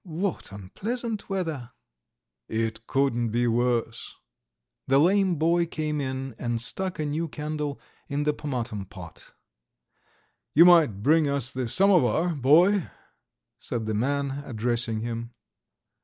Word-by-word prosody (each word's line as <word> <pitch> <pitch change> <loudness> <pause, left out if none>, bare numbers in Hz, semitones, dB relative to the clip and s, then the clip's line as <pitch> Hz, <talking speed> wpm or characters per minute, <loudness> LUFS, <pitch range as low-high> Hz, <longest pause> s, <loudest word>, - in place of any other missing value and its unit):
What 180 - -3
unpleasant 215 - -5
weather!" 160 -11 -3 0.7
"It 110 0 -3
couldn't 125 -4 +1
be 120 +2 0
worse." 120 -1 -1 0.7
The 135 - +4
lame 185 +4 +3
boy 170 +2 +2
came 155 -2 -2
in 130 -1 -4
and 120 -1 -2
stuck 185 +10 -2
a 155 - -2
new 155 +3 -2
candle 150 -1 -4 0.3
in 145 +1 -2
the 150 0 +1
pomatum 120 -9 -4
pot. 90 -5 -12 1.2
"You 165 +4 +8
might 155 - +5
bring 155 +1 +4
us 140 -2 +1
the 130 -3 -3
samovar, 175 - +3
boy," 160 +8 +4 0.7
said 115 -2 -4
the 110 - -2
man, 140 +4 -1
addressing 115 -2 -2
him. 115 +1 -5
140 Hz, 125 wpm, -26 LUFS, 120-165 Hz, 1.2 s, You